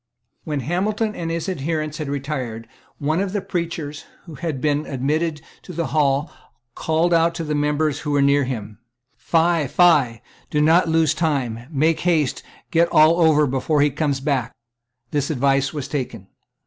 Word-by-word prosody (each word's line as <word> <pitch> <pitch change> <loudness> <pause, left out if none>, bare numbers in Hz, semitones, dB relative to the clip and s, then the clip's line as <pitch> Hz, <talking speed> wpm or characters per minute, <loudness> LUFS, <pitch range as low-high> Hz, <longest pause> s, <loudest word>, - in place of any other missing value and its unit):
When 150 -3 -2
Hamilton 210 - -1
and 165 -4 -4
his 165 +2 -3
adherents 155 -2 -3
had 150 -3 -4
retired, 130 -6 -4 0.3
one 155 +3 0
of 200 -1 -3
the 205 - 0
preachers 165 -5 -4 0.2
who 165 - -10
had 155 -2 -4
been 150 +1 0
admitted 150 +4 -1 0.2
to 180 - -10
the 170 0 -2
hall 145 0 +1 0.4
called 160 +5 +1
out 165 0 +3
to 165 - -3
the 150 -1 -2
members 150 0 0
who 150 - -5
were 145 -1 +2
near 140 0 +4
him; 110 -5 -6 0.4
"Fie! 165 -2 +1
Fie! 135 -8 +3 0.3
Do 150 - 0
not 160 +3 +4
lose 160 -2 +3
time. 135 -8 -2
Make 155 +2 +1
haste, 160 -6 +1
and - - -25
get 170 +1 +4
all 155 +3 +5
over 155 -2 +5
before 140 +3 0
he 145 0 +3
comes 140 -1 -1
back." 135 -5 -1 0.6
This 145 -1 -1
advice 135 -1 +1
was 145 -4 -5
taken. 115 -9 -5
150 Hz, 170 wpm, -21 LUFS, 140-165 Hz, 0.6 s, all